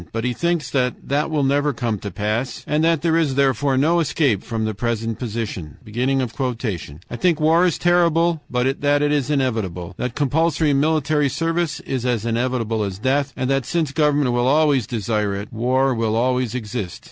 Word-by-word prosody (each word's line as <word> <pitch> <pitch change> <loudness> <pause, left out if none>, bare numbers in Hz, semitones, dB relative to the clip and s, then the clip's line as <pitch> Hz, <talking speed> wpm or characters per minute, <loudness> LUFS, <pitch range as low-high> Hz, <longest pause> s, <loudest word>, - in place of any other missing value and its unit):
But 115 0 -3
he 125 0 0
thinks 170 -2 -1
that 125 -2 +1
that 145 +3 +1
will 150 -3 0
never 145 +2 +2
come 115 -3 -2
to 100 - -5
pass, 105 +7 -3
and 150 +1 0
that 165 -3 +2
there 165 -1 +2
is, 155 -5 +1
therefore, 135 0 +2
no 165 +6 +3
escape 140 - +1
from 110 -2 -3
the 110 - -2
present 115 +1 -2
position. 110 - -5
"I 120 - -2
think 170 0 +2
war 165 +3 +4
is 160 -8 0
terrible, 170 0 +2
but 125 +2 0
that 145 0 +2
it 145 - +2
is 145 -3 0
inevitable; 110 - -1
that 125 -1 -3
compulsory 155 +1 +1
military 150 0 +2
service 165 +3 -1
is 130 -3 -3
as 120 -3 -1
inevitable 115 -1 -1
as 95 -2 -4
death, 135 +5 0
and 130 -1 -1
that 135 -3 0
since 165 -5 0
government 145 -3 +2
will 120 +1 +1
always 145 -4 +3
desire 105 -3 -1
it, 100 +2 -7
war 130 +4 +1
will 115 -2 0
always 125 0 0
exist." 105 -6 -4
130 Hz, 180 wpm, -21 LUFS, 115-150 Hz, -, war